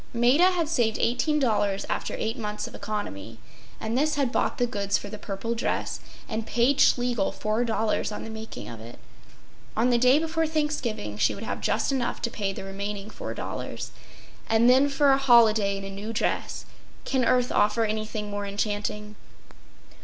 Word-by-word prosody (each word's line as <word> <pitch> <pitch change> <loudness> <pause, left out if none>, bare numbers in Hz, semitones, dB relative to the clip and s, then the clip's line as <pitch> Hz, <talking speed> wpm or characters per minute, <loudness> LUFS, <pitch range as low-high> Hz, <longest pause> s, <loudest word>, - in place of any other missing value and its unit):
Maida 255 +10 +5
had 350 -4 0
saved 240 -8 +1
$18 235 -6 +1
after - - -2
eight 220 +1 -2
months 210 -4 -4
of - - -9
economy; 115 - -5 0.4
and 220 +1 -3
this 305 +4 +2
had 275 -4 +1
bought - - 0
the 245 - +2
goods 200 -3 0
for 205 - -8
the 210 0 -8
purple 205 +3 -3
dress 235 - -2 0.3
and 225 -1 -3
paid 255 +4 +2
Schlegel 245 -5 +3
$4 220 0 0
on 210 - -5
the 225 - -7
making 220 0 -7
of 115 -2 -8
it. 115 +2 -11 0.8
On 240 +3 +3
the 240 - +3
day 255 +3 +6
before 325 +1 0
Thanksgiving 265 - -2
she - - +3
would 200 - -7
have - - -4
just - - +1
enough 255 -3 -1
to 235 - 0
pay 200 -4 -2
the 195 - -7
remaining 200 +2 -5
$4. - - -5 0.6
And 225 +1 +4
then 265 +3 +6
for 280 0 +4
a 270 - +4
holiday 220 -6 +5
in 195 - -6
a 195 - -6
new 205 +3 -5
dress—can 255 +3 -3
earth 250 +1 +2
offer 225 +2 +3
anything 215 -1 -3
more 205 0 -3
enchanting? 210 +1 -3
225 Hz, 170 wpm, -26 LUFS, 205-250 Hz, 0.8 s, day